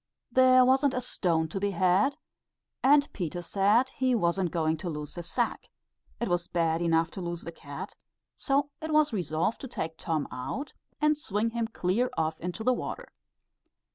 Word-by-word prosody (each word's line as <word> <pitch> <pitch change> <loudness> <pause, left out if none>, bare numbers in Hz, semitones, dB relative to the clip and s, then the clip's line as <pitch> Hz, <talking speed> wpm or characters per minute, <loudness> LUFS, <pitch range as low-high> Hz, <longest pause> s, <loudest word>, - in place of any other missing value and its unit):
There 255 0 +6
wasn't 265 +2 +3
a - - +1
stone 170 -9 0
to 195 - -3
be 205 +1 0
had, 190 +8 +2 0.6
and 285 +2 +5
Peter 175 -2 -4
said 205 +8 +3
he 255 -1 +1
wasn't 175 -2 +1
going 160 0 0
to 175 +3 -5
lose 150 -2 -5
his 175 -1 -7
sack; - - -1 0.5
it - - -1
was 175 -1 0
bad 165 -1 0
enough 165 0 +2
to 190 - -6
lose 175 -1 -4
the 170 - -6
cat; 145 -3 -8 0.4
so 280 +1 0
it 315 0 -4
was 305 -3 +3
resolved 175 +1 -1
to 265 - -5
take 160 -9 -5
Tom 155 -3 -1
out 175 - -5 0.3
and 300 0 +3
swing 225 -7 -1
him 230 -1 -1
clear 225 +3 0
off 160 0 -1
into 180 +5 -4
the 255 +2 +4
water. - - -5
190 Hz, 175 wpm, -28 LUFS, 165-255 Hz, 0.6 s, There